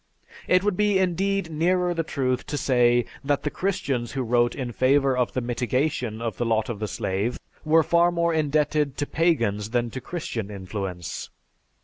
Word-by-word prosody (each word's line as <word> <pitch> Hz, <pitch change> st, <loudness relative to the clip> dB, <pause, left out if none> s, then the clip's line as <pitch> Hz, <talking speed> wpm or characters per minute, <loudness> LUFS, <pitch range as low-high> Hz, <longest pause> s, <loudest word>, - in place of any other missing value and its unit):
It 185 Hz, +1 st, +4 dB
would 205 Hz, -2 st, +1 dB
be 210 Hz, 0 st, +2 dB
indeed 190 Hz, 0 st, 0 dB
nearer 175 Hz, +3 st, +1 dB
the 165 Hz, -, 0 dB
truth 130 Hz, -5 st, -2 dB
to 145 Hz, -, -3 dB
say 120 Hz, -3 st, +3 dB, 0.2 s
that 145 Hz, 0 st, 0 dB
the 150 Hz, -, -1 dB
Christians 140 Hz, -, -2 dB
who 135 Hz, -1 st, -1 dB
wrote 120 Hz, 0 st, +2 dB
in 125 Hz, -3 st, -4 dB
favor 135 Hz, +2 st, +3 dB
of 125 Hz, -1 st, 0 dB
the 130 Hz, -, -1 dB
mitigation 125 Hz, -1 st, -1 dB
of 115 Hz, -5 st, -3 dB
the -, -, 0 dB
lot 110 Hz, -1 st, +1 dB
of 115 Hz, -4 st, -4 dB
the 105 Hz, -, -2 dB
slave 95 Hz, +4 st, -2 dB, 0.3 s
were 160 Hz, +1 st, +4 dB
far 170 Hz, +2 st, +3 dB
more 170 Hz, -1 st, +1 dB
indebted 150 Hz, -2 st, +1 dB
to 145 Hz, -, -1 dB
pagans 115 Hz, -, +1 dB
than 120 Hz, 0 st, 0 dB
to 130 Hz, -, -6 dB
Christian 155 Hz, -, -4 dB
influence." 95 Hz, -3 st, -5 dB
135 Hz, 175 wpm, -25 LUFS, 120-165 Hz, 0.3 s, It